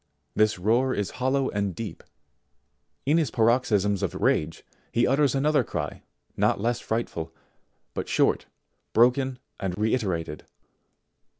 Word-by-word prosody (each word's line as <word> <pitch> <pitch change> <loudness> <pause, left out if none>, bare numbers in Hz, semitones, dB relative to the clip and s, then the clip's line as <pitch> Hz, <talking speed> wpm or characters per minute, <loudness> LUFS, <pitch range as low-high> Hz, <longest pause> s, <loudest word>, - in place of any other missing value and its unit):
This 110 -1 +3
roar 120 +8 +2
is 105 -2 -2
hollow 130 +1 +1
and 100 -3 -1
deep; 110 +3 -6 1.0
in 150 +5 +4
his 155 -6 +1
paroxysms 110 -4 +2
of - - -2
rage 80 +2 0 0.3
he 120 - +3
utters 140 +1 +3
another 150 +2 +3
cry - - -4 0.3
not - - +2
less 120 +3 0
frightful, 110 -8 -3 0.6
but - - -4
short, - - +2 0.5
broken, 125 +2 +3 0.2
and 95 -2 -3
reiterated. 95 -9 -1
115 Hz, 120 wpm, -26 LUFS, 100-130 Hz, 1.0 s, in